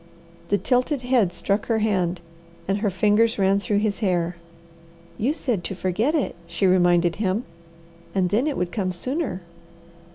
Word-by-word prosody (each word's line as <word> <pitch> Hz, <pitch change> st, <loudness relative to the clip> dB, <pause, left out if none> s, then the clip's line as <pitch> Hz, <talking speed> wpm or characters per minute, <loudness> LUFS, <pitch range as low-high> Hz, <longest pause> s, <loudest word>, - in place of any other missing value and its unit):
The 205 Hz, -, +3 dB
tilted 250 Hz, -, 0 dB
head 245 Hz, -7 st, +2 dB
struck 195 Hz, +4 st, -1 dB
her 225 Hz, -, +2 dB
hand, 185 Hz, -5 st, 0 dB, 0.5 s
and 195 Hz, +2 st, 0 dB
her 210 Hz, -1 st, +1 dB
fingers 210 Hz, +5 st, +2 dB
ran 195 Hz, 0 st, +3 dB
through 200 Hz, +1 st, 0 dB
his 205 Hz, -1 st, 0 dB
hair. 180 Hz, -4 st, 0 dB, 0.8 s
"You 245 Hz, +7 st, +2 dB
said 245 Hz, -, -2 dB
to 190 Hz, -, -3 dB
forget 210 Hz, -, 0 dB
it," 295 Hz, -, -1 dB
she 170 Hz, +4 st, -1 dB
reminded 175 Hz, -2 st, +3 dB
him, 205 Hz, +2 st, 0 dB, 0.7 s
"and 185 Hz, -2 st, +1 dB
then 240 Hz, +8 st, +2 dB
it 295 Hz, -, -1 dB
would 180 Hz, -1 st, -1 dB
come 190 Hz, -4 st, -1 dB
sooner." 255 Hz, -, -3 dB
200 Hz, 160 wpm, -23 LUFS, 180-230 Hz, 0.8 s, The